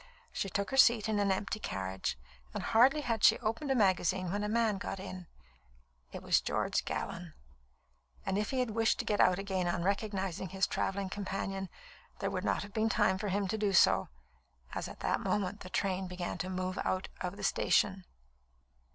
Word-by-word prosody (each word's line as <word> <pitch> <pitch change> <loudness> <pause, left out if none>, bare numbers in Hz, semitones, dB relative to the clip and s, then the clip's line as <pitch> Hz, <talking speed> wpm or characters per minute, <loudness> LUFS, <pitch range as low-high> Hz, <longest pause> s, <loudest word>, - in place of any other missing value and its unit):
She 195 - -2
took 200 +4 -2
her 270 - -1
seat 230 -4 +6
in 215 -1 +1
an 200 -1 +2
empty 200 +3 -2
carriage, 95 - -3 0.4
and - - -3
hardly 260 +7 +4
had 230 -6 -2
she - - +7
opened 230 +5 -2
a 270 - +3
magazine 185 -4 +2
when 205 +1 -1
a 210 - -1
man 220 -3 +1
got 195 - -4
in. 185 -2 -7 0.8
It - - -8
was - - +3
George - - -1
Gallon; 170 -2 -4 0.9
and 195 - 0
if 210 +1 0
he 260 -1 0
had 245 -3 -1
wished 225 +1 +2
to - - -3
get 210 - 0
out 180 0 +5
again 190 -2 -1
on 175 0 -1
recognising 195 -2 -1
his 190 +1 +1
travelling 195 0 -2
companion, 195 -1 -3 0.5
there - - -2
would - - -3
not - - 0
have 200 0 -11
been 220 0 +1
time 205 -4 +2
for 210 - -3
him 200 0 0
to 220 +2 -1
do 205 -2 +1
so, - - +5 0.6
as - - -3
at - - -11
that - - +1
moment 205 0 -1
the 185 - -9
train 190 -1 -1
began 180 -1 -4
to 185 +3 -3
move 185 0 -3
out 185 0 -1
of 180 +2 -3
the 205 - -8
station. 190 -1 +2
195 Hz, 195 wpm, -32 LUFS, 185-215 Hz, 0.9 s, she